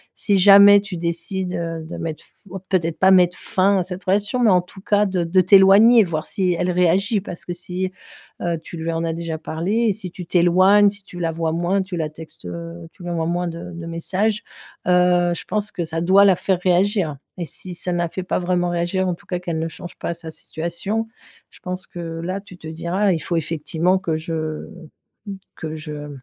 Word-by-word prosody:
si 200 -2 +1
jamais 200 +1 +8
tu 200 -3 -7
décides, 170 +2 -3
heu, 165 -1 -4
de 160 - -8
mettre 160 -2 -5
f - - -16 0.4
peut-être 170 -4 0
pas 190 0 +5
mettre 180 -1 +4
fin 195 +1 +1
à - - 0
cette 180 +2 -7
relation, 205 +5 0
mais 235 -3 +4
en 180 -1 +4
tout 180 +2 -15
cas 205 +1 +2
de 185 -3 -1
de 185 +3 +3
t'éloigner, 200 +5 +7
voir 160 -4 -3
si 185 -2 0
elle 180 +1 -1
réagit 190 +5 +2
parce 180 -3 -8
que 175 - -4
si, 180 +1 -3 0.5
heu, 170 -1 -1
tu 170 - -9
lui 165 +1 -3
en 165 0 -2
as 165 -1 -1
déjà 165 -1 -4
parlé 165 +5 -3 0.2
et - - +2
si 185 -3 -6
tu 180 - -8
t'éloignes, 185 +4 +5
si 205 0 -8
tu 180 -2 -11
la 165 -1 -1
vois 160 0 -2
moins, 175 +4 0
tu 185 -1 -5
la 155 -2 -2
textes, 160 +1 -13
heu, 170 0 -7
tu 185 - -15
lui 175 - -5
envoies 165 -1 -1
moins 175 +1 -1
de 170 +1 -7
de 170 0 -7
messages, 195 +6 -1 0.4
heu, 180 -1 +3
je - - -7
pense 210 0 -2
que 175 - -3
ça 160 +1 -3
doit 190 +4 +5
la 195 -2 +5
faire 185 0 0
réagir. 180 -3 +1 0.2
Et 175 - -3
si 180 +4 -6
ça 180 +1 -4
ne - - -1
la 170 -1 -1
fait 185 +2 -5
pas - - -1
vraiment 175 0 0
réagir, 175 +2 -1
en 180 - -1
tout 200 - -23
cas 180 -3 -3
qu'elle 170 -2 -3
ne 165 - -2
change 175 +2 -9
pas - - -3
sa 170 -1 -9
situation, 170 +9 -4 0.4
je - - -19
pense 185 0 -5
que 175 - -10 0.2
là 185 +3 -3
tu 190 -3 -14
te 160 - -10
diras: 175 +5 0
«Il 165 - -1
faut 170 - -1
effectivement 165 +3 0
que 175 -4 -2
je, 160 -1 -4 0.9
que 160 0 -6
je 150 -1 -7
180 Hz, 220 wpm, -21 LUFS, 165-190 Hz, 0.9 s, jamais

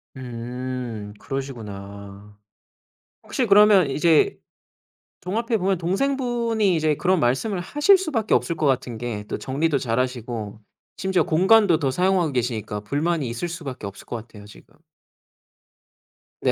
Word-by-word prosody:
음 125 -3 -6
그러시구나. 105 -6 -7 0.9
혹시 255 - -1
그러면 200 -6 +6
이제 155 +3 +3 0.8
종합해 225 +5 -1
보면 190 -1 +1
동생분이 230 0 0
이제 155 -2 +1
그런 185 +3 +1
말씀을 155 - 0
하실 295 - +4
수밖에 280 - -1
없을 170 - 0
것 155 -1 -1
같은 125 -3 0
게 115 -3 -4
또 - - -3
정리도 145 +3 0
잘하시고 120 -4 -3 0.4
심지어 190 -1 +1
공간도 185 +1 +4
더 140 -4 0
사용하고 180 +1 +1
계시니까 115 -4 -2
불만이 150 +6 -1
있을 120 +9 -3
수밖에 145 - -6
없을 100 - -11
것 - - -6
같아요 105 -2 -12
지금. 105 - -17 1.7
네 - - +2
145 Hz, 290 characters per minute, -23 LUFS, 120-190 Hz, 1.7 s, 그러면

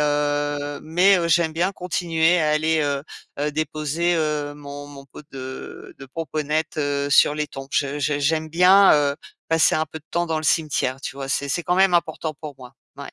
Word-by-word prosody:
heu, 145 -1 -1
mais, 180 +4 +4
heu, 170 -1 -1
j'aime 165 -1 +2
bien 175 +4 0
continuer 175 -2 +1
à 155 - +1
aller, 155 +1 +1
heu 140 -1 -1 0.4
heu, 150 +1 -1
déposer, 155 +3 -1
heu, 150 -2 -1
mon 145 0 -9
mon 140 -1 -12
pot 140 +2 -13
de 130 -1 -8
de 135 - -10
pomponette 155 +1 -3 0.3
sur 145 - +5
les 150 0 -2
tombes. 135 0 -9
Je 140 0 0
je 145 0 0
j'aime 155 +2 0
bien, 185 +4 +6
heu, 145 -1 +2 0.3
passer 165 -1 +3
un 155 - +1
peu 160 - -9
de 155 - -28
temps 175 0 0
dans 160 -1 -1
le - - -5
cimetière, 140 -4 0
tu - - -6
vois? 135 -1 -6
C'est 140 +1 -1
c'est 170 +5 -1
quand 180 - 0
même 190 -1 +4
important 160 -2 0
pour 150 -1 -9
moi. 125 0 -12 0.2
Mouais. - - -24
155 Hz, 200 wpm, -22 LUFS, 145-165 Hz, 0.4 s, bien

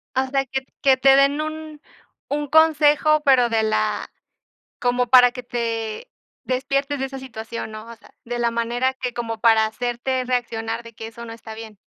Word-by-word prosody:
Ah, 260 - +2
o 260 - -8
sea, 275 0 +1
que 265 +1 -3
t - - -35
que 270 -1 +5
te 270 +1 +5
den 280 +2 +3
un 310 -1 -6 0.5
un 295 0 -1
consejo, 305 0 +4
pero 260 -3 +5
de 225 -1 +1
la 215 0 -1 0.7
como 245 -1 0
para 245 0 +7
que 250 - -7
te 230 - -4 0.4
despiertes 275 +2 -1
de 270 - -1
esa 270 0 -8
situación, 230 -3 -7
¿no? 215 +1 -9
O 230 - -10
sea, - - -21
de 240 +1 -4
la 235 0 +1
manera 240 +3 -1
que 250 -2 -4
como 230 -2 -4
para 225 -1 +4
hacerte 245 +3 -2
reaccionar 230 -2 -2
de 230 0 -12
que 225 - -8
eso 235 +1 -10
no 225 - -8
está 225 -1 -10
bien. 220 -1 -10
245 Hz, 195 wpm, -22 LUFS, 230-270 Hz, 0.7 s, para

